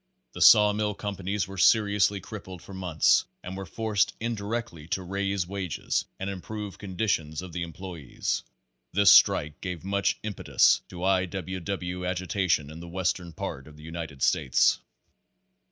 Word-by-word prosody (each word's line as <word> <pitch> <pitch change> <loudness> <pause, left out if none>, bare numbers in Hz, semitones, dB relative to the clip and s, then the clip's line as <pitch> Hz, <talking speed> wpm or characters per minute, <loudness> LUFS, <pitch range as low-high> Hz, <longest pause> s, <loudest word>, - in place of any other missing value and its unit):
The - - -7
saw 105 -2 +8
mill 105 -1 -1
companies 100 -1 -3
were 95 -1 -7
serious 105 -1 +4
ly 100 -1 -5
crippled 95 -5 -9
for 100 - -11
months, 90 -5 +3 0.2
and 90 +1 -6
were 95 -1 -6
forced 110 +2 0
indirectly 110 -7 -4
to 95 +2 -2
raise 100 0 -1
wages 95 -2 -2
and 95 - -3
improve 100 +1 -6
conditions 90 -5 -2
of 90 -2 -9
the 85 - -3
employes. 85 -3 -4 0.5
This 100 +1 +6
strike 75 0 +5
gave 90 -3 -5
much 100 +1 0
impetus 105 -2 +3
to 90 -1 -8
I. 95 -1 +3
W. 95 0 -5
W. 90 0 -4
agitation 90 -4 0
in 80 - -9
the 85 - -9
western 90 0 -2
part 70 -3 -6
of 75 -1 -14
the 75 - -14
United 80 -4 -6
States. 65 - +3
95 Hz, 155 wpm, -27 LUFS, 85-100 Hz, 0.5 s, saw